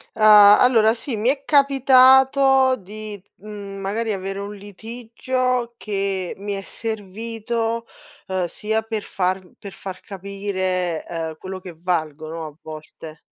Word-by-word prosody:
Uhm, 220 - -7
allora 215 +2 +7
sì, 245 +1 -4
mi 215 +3 +1
è 275 +1 -1
capitato 265 -1 +5
di, 210 -1 -9
mhmm, 205 -1 -9
magari 215 +4 -2
avere 195 0 -4
un 200 +1 -6
litigio 235 +4 -3
che 195 -4 -3
mi 200 +1 -4
è 195 - -4
servito, 225 +2 -4 0.4
uhm, 185 -2 -1
sia 220 +5 -2
per 220 -2 -4
far 185 0 -2
per 200 - -9
far 190 -1 -8
capire 185 -3 -3
ehm 160 -2 -5
quello 185 +2 -7
che 180 -3 -10
valgono 160 -2 -3
a 150 - -12
volte 155 0 -11
205 Hz, 130 wpm, -22 LUFS, 185-230 Hz, 0.4 s, allora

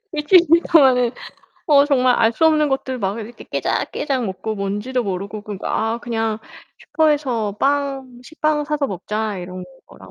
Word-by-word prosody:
일주일 335 +4 +4 0.2
동안은 255 -6 +5 0.6
어 285 -3 +6
정말 255 -4 +3
알 225 0 +3
수 320 +8 +3
없는 305 -1 +3
것들 260 -1 -2
막 195 +1 -2
이렇게 225 +2 -10
깨작깨작 265 -4 -2
먹고 200 +3 -4
뭔지도 205 +6 -2
모르고 200 +2 -4
그리고 205 -2 -7
아 225 +1 -1
그냥 225 -2 -2 0.4
'슈퍼에서 265 -10 0
빵 275 -3 -1
식빵 305 +2 -1
사서 295 -1 -1
먹자.' 210 +1 -4
이런 180 +1 -7 0.2
거랑 - - -15
245 Hz, 310 characters per minute, -20 LUFS, 215-285 Hz, 0.6 s, 어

